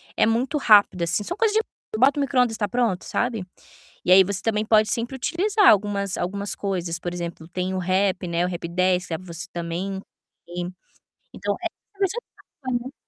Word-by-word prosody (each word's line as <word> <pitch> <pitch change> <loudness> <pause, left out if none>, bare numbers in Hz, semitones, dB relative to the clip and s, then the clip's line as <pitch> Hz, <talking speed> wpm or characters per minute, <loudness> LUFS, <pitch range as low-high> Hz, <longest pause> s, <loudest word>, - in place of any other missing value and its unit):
É - - +4
muito 250 +6 +1
rápido, 205 -7 +5
assim, 170 +5 0
são - - -3
coisa 445 -2 +2
de 440 - +5 0.4
bota 270 +5 +4
o - - +2
micro-ondas 250 -4 +2
e - - -9
tá 205 - +1
pronto, 225 -4 0
sabe. 230 -6 -1 0.6
E 180 - +4
aí 190 +1 +9
você 195 0 -2
também 215 -1 0
pode 215 -1 +4
sempre 240 +3 -2
utilizar 395 - +1
algumas 200 -2 +3
algumas 200 +3 -2
coisas, 180 -4 -2
por 175 - -4
exemplo, 170 -2 -6
tem 180 +1 -3
o - - -1
Rap, 185 0 0
né, 170 +1 0
o - - -2
Rap10, 180 +1 0
que 185 - -14
você 170 +2 -7
também 175 +3 -3 1.4
então - - -2
é - - +2 0.3
coisa 390 +3 0 0.4
prática, 250 -2 -2
né. 270 - -11
200 Hz, 185 wpm, -24 LUFS, 180-240 Hz, 1.4 s, aí